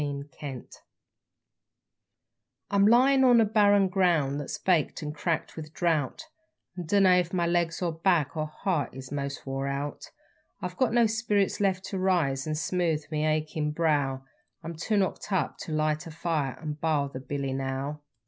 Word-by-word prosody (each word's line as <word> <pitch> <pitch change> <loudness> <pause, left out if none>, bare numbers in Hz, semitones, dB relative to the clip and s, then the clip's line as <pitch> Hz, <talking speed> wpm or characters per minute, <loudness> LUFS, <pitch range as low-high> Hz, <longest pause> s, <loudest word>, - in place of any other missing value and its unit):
Knocked 145 0 -6
Up 135 -4 -5 2.1
I'm 200 0 +4
lyin' 265 +4 +5
on 245 -2 +6
the 225 - +5
barren 205 -2 +4
ground 170 -7 +1
that's 140 - -5
baked 170 -5 +1
and 150 0 -4
cracked 160 +1 -2
with 155 0 -9
drought, 165 - 0 0.5
And 175 -3 -6
dunno 185 0 +5
if 175 -1 -2
my 175 -2 +1
legs 170 0 0
or 170 - 0
back 165 -3 +1
or 155 -1 -2
heart 150 -4 -2
is 130 0 -9
most 140 -1 -4
wore 135 0 -3
out; 140 +1 -4 0.5
I've 180 0 -5
got 255 -4 +2
no 235 0 +4
spirits 215 -2 0
left 190 -2 0
to 195 - -3
rise 160 -8 +1
and 155 0 -1
smooth 165 -2 0
me 155 0 0
achin' 155 0 -1
brow 145 -5 0 0.4
I'm 165 +2 -5
too 205 +7 -1
knocked 195 +1 -1
up 180 -8 -1
to - - -7
light 155 0 0
a - - -8
fire 155 -5 -2
and 150 -2 -6
bile 150 -3 +1
the 130 - -7
billy 135 0 -3
now. 135 +2 -3
160 Hz, 170 wpm, -27 LUFS, 145-185 Hz, 2.1 s, on